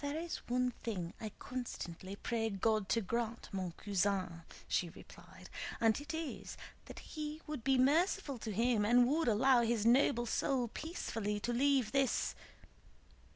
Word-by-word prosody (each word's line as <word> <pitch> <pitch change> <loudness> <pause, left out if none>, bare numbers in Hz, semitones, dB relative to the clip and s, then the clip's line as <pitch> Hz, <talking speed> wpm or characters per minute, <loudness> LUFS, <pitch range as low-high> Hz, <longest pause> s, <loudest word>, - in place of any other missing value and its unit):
"There 285 +1 -2
is 335 +1 -3
one 250 +1 +1
thing 185 -7 -3
I 220 - -3
constantly 195 -7 -6
pray 225 +1 -1
God 215 0 +1
to 230 +4 +2
grant, 230 +3 -3
mon 185 -4 -3
cousin," 190 -3 -1 0.3
she 175 - 0
replied, - - -13 0.3
"and 225 +3 +3
it 295 +2 -6
is 320 -2 -5 0.3
that - - -10
He 305 0 -6
would 300 -6 -5
be 265 +1 +3
merciful 290 - +2
to 220 - -4
him 230 +1 +2
and 240 +3 +5
would 310 +3 +1
allow 245 +3 +5
his 230 -2 +1
noble 240 0 +4
soul 245 +1 0
peacefully 225 - -3
to 240 - -1
leave 265 -3 +3
this..." 275 -1 +1
235 Hz, 155 wpm, -35 LUFS, 210-275 Hz, 0.3 s, and